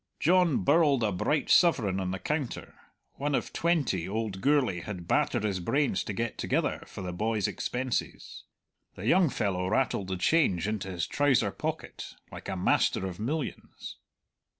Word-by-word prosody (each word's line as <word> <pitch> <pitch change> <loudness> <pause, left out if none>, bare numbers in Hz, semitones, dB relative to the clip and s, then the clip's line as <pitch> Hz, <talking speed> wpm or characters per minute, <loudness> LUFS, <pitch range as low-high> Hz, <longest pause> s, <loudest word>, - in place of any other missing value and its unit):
John 175 -3 +3
birled 145 -4 +4
a 105 - +1
bright 140 +10 0
sovereign 110 - +4
on 95 -1 -2
the 95 - -2
counter, 150 +4 -3 0.4
one 145 0 0
of - - -3
twenty 145 - 0
old 105 -2 -3
Gourlay 135 -10 +2
had 90 -2 -7
battered - - +1
his 100 -3 -1
brains 135 +4 0
to 100 - -3
get 115 +2 -3
together - - 0
for 100 - -8
the 90 -1 -4
boy's 105 +1 0
expenses. 125 -1 -3 0.5
The 95 - -7
young 175 +5 +4
fellow 95 -6 -1
rattled 110 -2 0
the 95 -1 -3
change 95 - +2
into 105 -3 -3
his 90 -3 -2
trouser 135 -8 +2
pocket - - -5 0.2
like - - -8
a - - -2
master 90 +1 +2
of 95 -1 -6
millions. 145 +7 -5
110 Hz, 160 wpm, -29 LUFS, 95-145 Hz, 0.5 s, birled